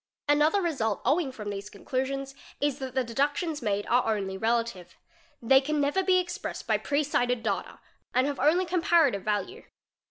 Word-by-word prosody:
a -, -, +4 dB
Another 305 Hz, +7 st, +3 dB
result 230 Hz, -, -1 dB
flowing 305 Hz, -4 st, +1 dB
from 210 Hz, -5 st, -6 dB
these 200 Hz, +1 st, -6 dB
conclusions 270 Hz, +5 st, -3 dB, 0.3 s
is 290 Hz, -1 st, 0 dB
that 260 Hz, -1 st, -6 dB
the 260 Hz, -, +2 dB
deduction 285 Hz, +7 st, -1 dB
made 205 Hz, -3 st, -1 dB
are 230 Hz, -3 st, +2 dB
only 190 Hz, -1 st, -4 dB
relative; 225 Hz, -3 st, -1 dB, 0.5 s
they 265 Hz, +3 st, +6 dB
can 300 Hz, +2 st, -1 dB
never 290 Hz, +6 st, +2 dB
be 375 Hz, -1 st, +3 dB
expressed 360 Hz, -1 st, -3 dB
by -, -, +1 dB
pre 285 Hz, +1 st, 0 dB
cited 245 Hz, -4 st, 0 dB
data 200 Hz, -4 st, -2 dB, 0.4 s
ar 255 Hz, -, +4 dB
have 280 Hz, -1 st, -2 dB
only 320 Hz, +7 st, +3 dB
comparative 330 Hz, -, +2 dB
value. 215 Hz, -, -2 dB
265 Hz, 170 wpm, -28 LUFS, 225-300 Hz, 0.5 s, they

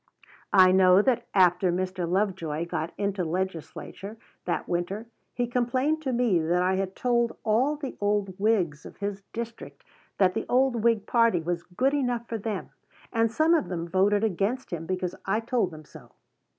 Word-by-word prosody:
I 185 Hz, -1 st, +8 dB
know 185 Hz, +1 st, +6 dB
that 255 Hz, -1 st, +1 dB
after 180 Hz, -1 st, +4 dB
Mr. 185 Hz, -1 st, -2 dB
Lovejoy 180 Hz, -5 st, -1 dB
got 170 Hz, -1 st, -3 dB
into 200 Hz, -2 st, -1 dB
the 160 Hz, -, -3 dB
legislature 190 Hz, +4 st, -5 dB, 0.3 s
that 175 Hz, -, -2 dB
winter 180 Hz, +5 st, -2 dB, 0.3 s
he 245 Hz, -, 0 dB
complained 255 Hz, +6 st, 0 dB
to 270 Hz, -4 st, -2 dB
me 235 Hz, -7 st, +2 dB
that 175 Hz, +3 st, +1 dB
I 190 Hz, +1 st, +1 dB
had 190 Hz, 0 st, -3 dB
told 235 Hz, -2 st, 0 dB
all 250 Hz, +8 st, +2 dB
the 290 Hz, -3 st, -6 dB
old 205 Hz, -2 st, 0 dB
Whigs 190 Hz, -8 st, +1 dB
of -, -, -12 dB
his 200 Hz, 0 st, -4 dB
district 230 Hz, 0 st, -7 dB, 0.3 s
that 185 Hz, -2 st, +3 dB
the -, -, -3 dB
old 255 Hz, 0 st, +3 dB
Whig 230 Hz, -2 st, +2 dB
party 230 Hz, -6 st, +3 dB
was 170 Hz, 0 st, -2 dB
good 255 Hz, +12 st, -1 dB
enough 245 Hz, -4 st, -1 dB
for 225 Hz, -, -4 dB
them, 210 Hz, -2 st, -4 dB, 0.4 s
and 225 Hz, -1 st, +2 dB
some 315 Hz, +7 st, +3 dB
of 320 Hz, -4 st, +2 dB
them 170 Hz, -2 st, -3 dB
voted 200 Hz, +4 st, +2 dB
against 215 Hz, +3 st, -1 dB
him 165 Hz, -1 st, -4 dB
because 185 Hz, -1 st, -2 dB
I 205 Hz, +3 st, +2 dB
told 230 Hz, -4 st, 0 dB
them 155 Hz, -2 st, -12 dB
so. 145 Hz, -6 st, -15 dB
200 Hz, 175 wpm, -27 LUFS, 180-235 Hz, 0.4 s, I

